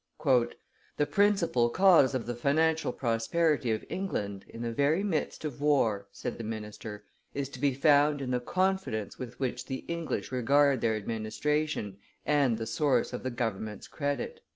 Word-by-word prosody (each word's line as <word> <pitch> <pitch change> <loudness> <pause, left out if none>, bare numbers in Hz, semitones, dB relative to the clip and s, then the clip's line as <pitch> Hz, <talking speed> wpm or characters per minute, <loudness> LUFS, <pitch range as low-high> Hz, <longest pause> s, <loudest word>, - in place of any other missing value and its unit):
"The 125 +2 0
principal 195 - +3
cause 165 -3 +5
of 125 - -2
the 120 - -3
financial 160 +6 +1
prosperity 135 +4 +1
of 110 -1 -1
England, 100 - -3
in 115 - -7
the 115 - -2
very 145 - +2
midst 165 -5 -2
of 145 -2 -5
war, 115 -9 +2
said 100 - -5
the - - -4
minister, 105 -1 -6 0.3
"is 140 -1 -2
to 130 - -10
be 140 -1 +1
found 145 +1 +4
in 130 -2 -3
the 125 - +1
confidence 185 - -1
with 125 -2 -7
which 125 -1 -3
the 130 -1 -5
English 170 -5 -3
regard 135 +1 +3
their 110 -1 +2
administration 110 +1 -2 0.3
and 140 -6 +3
the 115 - -4
source 125 +2 +1
of 125 - -4
the 130 - -2
government's 110 -4 -4
credit." 145 - -3
130 Hz, 160 wpm, -29 LUFS, 115-150 Hz, 0.3 s, cause